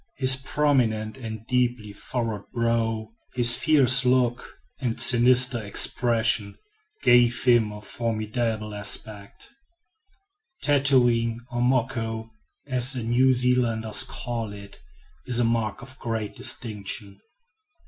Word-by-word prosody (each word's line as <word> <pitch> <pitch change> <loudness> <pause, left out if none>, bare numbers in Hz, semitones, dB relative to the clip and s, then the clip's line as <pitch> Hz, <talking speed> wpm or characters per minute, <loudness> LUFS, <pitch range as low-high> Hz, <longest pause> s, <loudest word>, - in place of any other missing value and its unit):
His 130 -1 +5
prominent 130 -6 -1
and 110 -4 -8
deeply 120 -4 -2
furrowed 115 -1 -5
brow, 115 -2 -2 0.3
his 120 -1 +7
fierce 135 -4 +4
look, 125 -1 -1 0.2
and 120 -4 -3
sinister 125 0 +5
expression, 110 0 +1 0.5
gave 120 -1 +3
him 120 -4 +3
a 105 0 -10
formidable 110 -1 -3
aspect. 105 0 -4 1.1
Tattooing, 120 -5 +2
or 120 -1 -3
"moko," 115 -3 -2 0.3
as 130 -1 0
the 125 -3 -5
New 125 +3 +2
Zealanders 120 -3 +1
call 115 -3 -6
it, 100 -5 -13 0.5
is 125 -1 0
a - - +2
mark 115 -1 -2
of 130 +1 -14
great 115 -3 -5
distinction. 100 -2 -4
120 Hz, 105 wpm, -24 LUFS, 110-125 Hz, 1.1 s, his